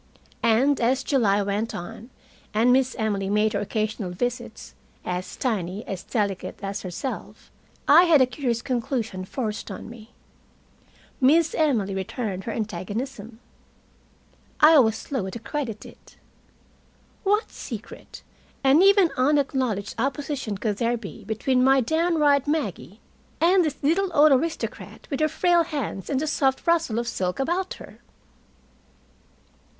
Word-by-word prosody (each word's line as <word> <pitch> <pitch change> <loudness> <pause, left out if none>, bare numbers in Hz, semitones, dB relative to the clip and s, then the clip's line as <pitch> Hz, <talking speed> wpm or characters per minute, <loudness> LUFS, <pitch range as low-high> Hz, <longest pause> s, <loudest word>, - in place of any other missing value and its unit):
And, 255 +5 +3
as 255 +3 +2
July 205 -7 +2
went 205 +3 -2
on, 225 +6 -8 0.5
and 235 +3 +4
Miss 260 0 +2
Emily 205 -4 -1
made 210 +1 +2
her - - 0
occasional 215 -1 -2
visits, 245 +8 -4 0.3
as 180 0 -4
tiny, 205 -4 -2
as 190 -2 -5
delicate 200 -5 -2
as 195 0 -3
herself, 185 +8 -6 0.4
I 335 +5 +8
had 325 -4 +5
a 260 - +6
curious 245 -2 -2
conclusion 235 -7 -2
forced 220 -1 -4
on - - -8
me. 230 -1 -13 1.1
Miss 320 +5 +4
Emily 235 -11 +1
returned 190 0 -4
her 230 - -3
antagonism. 220 +3 -5 1.2
I 305 0 +8
was 225 -3 +3
slow 225 -8 -4
to 210 - -6
credit 235 -2 -5
it. - - -16 1.1
What 415 +2 +1
secret 230 -2 -9 0.4
and 275 +5 +5
even 395 -3 +5
unacknowledged 260 -6 +1
opposition 270 -4 -2
could 210 0 -2
there 235 +1 0
be 220 -4 -9
between 250 +4 +1
my 270 +1 +5
downright 300 0 +2
Maggie 225 - -3 0.4
and 360 +2 +4
this 295 -3 -2
little 360 +7 +2
old 300 0 +6
aristocrat 315 +5 -2
with 275 - -2
her 310 0 +2
frail 350 +2 +3
hands 285 - -5
and 275 - 0
the 310 - -1
soft 270 -3 0
rustle 330 -9 +2
of 235 0 -2
silk 180 -5 -2
about 350 +7 -1
her? - - -13
245 Hz, 135 wpm, -24 LUFS, 210-290 Hz, 1.2 s, I